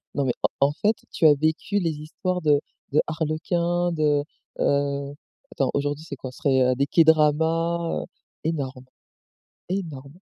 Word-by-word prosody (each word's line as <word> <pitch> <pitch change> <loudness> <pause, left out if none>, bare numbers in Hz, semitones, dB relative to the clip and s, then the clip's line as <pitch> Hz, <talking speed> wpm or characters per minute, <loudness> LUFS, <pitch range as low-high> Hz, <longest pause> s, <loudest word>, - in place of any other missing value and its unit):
Non 140 - +1
mais 125 - +1
en - - +3 0.2
en - - -2
fait 210 +7 +1 0.2
tu - - +1
as 150 - +8
vécu 160 +7 0
les 165 -3 0
histoires 160 +4 -3
de 145 -2 +4 0.3
de 150 - +3
Arlequin, 170 +3 -1
de, 150 -3 +2 0.4
heu, 140 0 0 0.4
attends 135 - 0
aujourd'hui 145 +2 -1
c'est 145 -4 -7
quoi, 130 0 -7
ce - - -15
serait 130 -2 +3
des 140 +2 +1
K-dramas, 165 +2 +3
heu, - - -7 0.4
énorme, 135 -5 -3 0.8
énorme! 160 -4 -5
155 Hz, 150 wpm, -24 LUFS, 140-165 Hz, 0.8 s, as